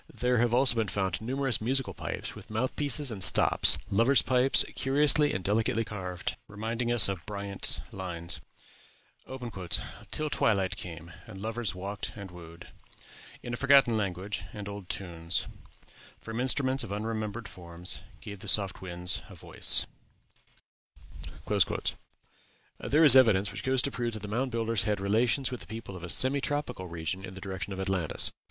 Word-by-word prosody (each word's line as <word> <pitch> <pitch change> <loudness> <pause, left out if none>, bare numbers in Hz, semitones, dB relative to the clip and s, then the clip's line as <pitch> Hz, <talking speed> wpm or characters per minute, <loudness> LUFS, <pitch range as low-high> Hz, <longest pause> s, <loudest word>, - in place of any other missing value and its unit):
There 125 -1 0
have 120 0 +2
also 125 +1 +4
been 115 -2 -1
found 95 -1 -2
numerous 130 +1 -1
musical 130 +4 0
pipes, - - -6
with - - -13
mouth 110 +4 -2
pieces 145 -2 +2
and 100 -4 -4
stops; - - +5
lovers' 115 +7 +4
pipes, 130 +1 +4
curiously 145 +2 +3
and 95 - -3
delicately 110 +3 +1
carved, 95 -4 -5
reminding 115 +3 -3
us 120 -3 +9
of 95 -4 -4
Bryant's 100 -1 0
lines 85 -2 -4 1.7
"Till 155 0 -3
twilight 95 -3 +1
came, 85 -2 -8 0.2
and 95 - -10
lovers 110 0 -3
walked 100 +2 -5
and 100 -3 -9
wooed 85 -1 -12 0.7
In 120 - -6
a - - -2
forgotten 140 -4 +5
language; 100 -1 -3
and 105 -1 -7
old 100 -2 -8
tunes, 85 -2 -2 0.7
From 115 +1 -6
instruments 130 +1 +2
of - - -8
unremembered 110 +1 -4
forms, 85 0 -6 0.2
Gave 100 -1 -9
the - - -10
soft 100 -3 +3
winds 90 0 -2
a - - -12
voice." - - +4 2.9
There 155 +3 +2
is 140 -5 +9
evidence 105 -7 +5
which 100 +2 -7
goes 130 0 +2
to 140 - -1
prove 120 -2 -3
that 110 - -7
the - - -5
Mound 125 +6 -1
Builders 115 -3 -1
had 105 -2 0
relations 115 +6 +1
with 125 - -5
the - - -11
people 110 -3 -8
of 90 - -9
a 85 - -7
semi 130 +9 +2
tropical 145 -11 -3
region 85 +3 -4
in 95 -1 -9
the - - -8
direction 95 0 -5
of 95 - -6
Atlantis. 95 -4 +2
105 Hz, 160 wpm, -29 LUFS, 95-125 Hz, 2.9 s, us